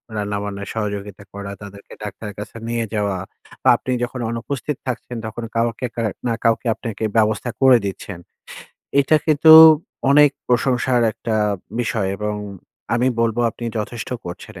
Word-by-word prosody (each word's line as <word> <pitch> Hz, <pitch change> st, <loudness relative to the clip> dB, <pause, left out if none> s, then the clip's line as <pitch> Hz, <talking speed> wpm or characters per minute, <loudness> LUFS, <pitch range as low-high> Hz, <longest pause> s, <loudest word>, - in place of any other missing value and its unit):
রান্না-বান্নায় 100 Hz, -1 st, -4 dB
সহযোগিতা 100 Hz, -2 st, -4 dB
করা, 100 Hz, 0 st, -6 dB
তাদেরকে 100 Hz, 0 st, -11 dB
ডাক্তারের 105 Hz, -1 st, -7 dB
কাছে 105 Hz, +2 st, -8 dB
নিয়ে 115 Hz, -1 st, -1 dB
যাওয়া, 100 Hz, -3 st, 0 dB, 0.5 s
বা -, -, +5 dB
আপনি 130 Hz, -, -5 dB
যখন 125 Hz, +1 st, -4 dB
অনুপস্থিত 125 Hz, +4 st, -4 dB
থাকছেন, 125 Hz, -1 st, -4 dB
তখন 110 Hz, +2 st, -6 dB
কাউকে 115 Hz, +2 st, 0 dB
কা 115 Hz, -, -2 dB, 0.3 s
না 115 Hz, -, +1 dB
কাউকে 115 Hz, +1 st, +1 dB
আপনাকে 115 Hz, -2 st, -6 dB
ব্যবস্থা 110 Hz, +2 st, +1 dB
করে 130 Hz, -2 st, +7 dB
দিচ্ছেন। 95 Hz, -1 st, -6 dB, 0.8 s
এটা 140 Hz, +3 st, +4 dB
কিন্তু 155 Hz, 0 st, +5 dB, 0.6 s
অনেক 145 Hz, +1 st, +7 dB, 0.2 s
প্রশংসার 125 Hz, 0 st, +2 dB
একটা 110 Hz, +1 st, -3 dB, 0.4 s
বিষয় 110 Hz, -4 st, -1 dB
এবং 105 Hz, 0 st, -2 dB, 0.6 s
আমি 125 Hz, +2 st, +2 dB
বলব 115 Hz, 0 st, +1 dB
আপনি 120 Hz, -, -8 dB
যথেষ্ট 110 Hz, +2 st, -5 dB, 0.2 s
করছেন 95 Hz, +4 st, -8 dB
115 Hz, 140 wpm, -20 LUFS, 105-120 Hz, 0.8 s, করে